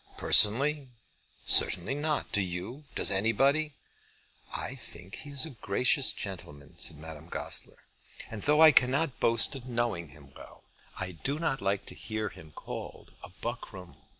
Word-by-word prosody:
"Personally? 135 +6 +6 0.6
certainly 90 +9 +5
not. 150 +1 -2
Do 105 - 0
you? 95 +11 -6
Does - - +2
anybody?" 135 +9 0 0.8
"I - - -6
think 95 +4 -12
he 150 - -11
is 140 +1 +1
a 160 - -9
gracious 125 +4 +1
gentleman," 75 -7 -8
said - - -2
Madame 80 +1 -12
Goesler, - - -4 0.5
"and 110 -2 -7
though 150 +5 +2
I 160 - +8
cannot 135 +2 +1
boast 115 +3 +2
of 130 -2 -9
knowing 120 -8 -3
him 70 -2 -17
well, - - -15 0.3
I 95 -1 -5
do 135 - -5
not 155 -4 -3
like 100 0 -2
to - - -5
hear 110 -1 -5
him 80 - -15
called - - -10 0.3
buckram. 105 -6 -8
115 Hz, 150 wpm, -28 LUFS, 95-140 Hz, 0.8 s, I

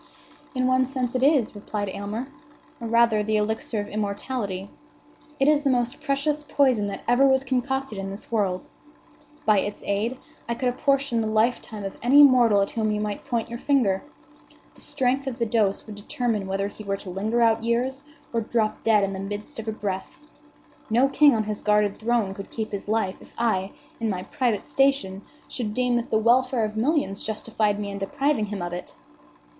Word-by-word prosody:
"In 255 0 +1
one 255 0 +3
sense 255 -2 -2
it 255 - 0
is," 275 -4 +3
replied 205 0 -4
Aylmer; 205 +6 -4 0.5
"or, 235 - -5
rather, 230 -2 +4
the 215 +1 +1
elixir 220 +1 -1
of 205 - -3
immortality. 200 -1 -3 0.7
It 270 - +3
is 300 -1 +4
the 285 - +1
most 245 +2 0
precious 295 +1 0
poison 265 -7 +2
that 200 - -6
ever 245 +3 +5
was 265 0 +3
concocted 265 -3 -2
in 195 0 -4
this 200 +4 -9
world. 195 -5 0 0.8
By 215 -2 +5
its 205 +1 -4
aid 215 +6 -1 0.3
I 235 - 0
could 250 +1 0
apportion 275 -1 +1
the 220 - -1
lifetime 215 -1 0
of 195 - -6
any 275 +5 +7
mortal 240 -7 +6
at 195 - -4
whom 220 -2 0
you 210 - -1
might 210 -1 -3
point 235 -4 -1
your 235 0 -6
finger. 235 -11 +2 0.7
The - - -16
strength 265 +2 0
of 250 -3 -3
the 235 - 0
dose 215 -3 +1
would 215 - -8
determine 210 0 -2
whether 195 +1 -1
he 215 - -10
were 195 -1 -2
to 190 -2 -8
linger 215 +6 -1
out 225 -1 +3
years, 250 +4 0 0.3
or 230 - +1
drop 220 -1 -1
dead 215 -2 +4
in 195 0 -1
the 190 - -5
midst 205 +7 -6
of 225 - -7
a - - 0
breath. 200 -3 -5 0.7
No 245 +5 +4
king 290 -2 +5
on 220 - +1
his 210 -1 -4
guarded 210 -1 +2
throne 225 -3 +1
could 195 0 -8
keep 220 -1 -4
his 200 -1 -5
life 215 -3 -1
if - - -17
I, 200 -5 0 0.3
in 225 -1 -1
my 185 -2 -2
private 250 -6 -1
station, 270 -9 +1 0.3
should 215 -4 -4
deem 250 -1 +1
that 235 - -3
the 220 - +3
welfare 240 +1 +3
of 215 0 -5
millions 255 -3 0
justified 215 -1 -1
me 205 -1 -4
in 200 - -5
depriving 220 +3 0
him 200 -3 -4
of 175 0 -4
it." 175 - -7
225 Hz, 195 wpm, -25 LUFS, 205-255 Hz, 0.8 s, any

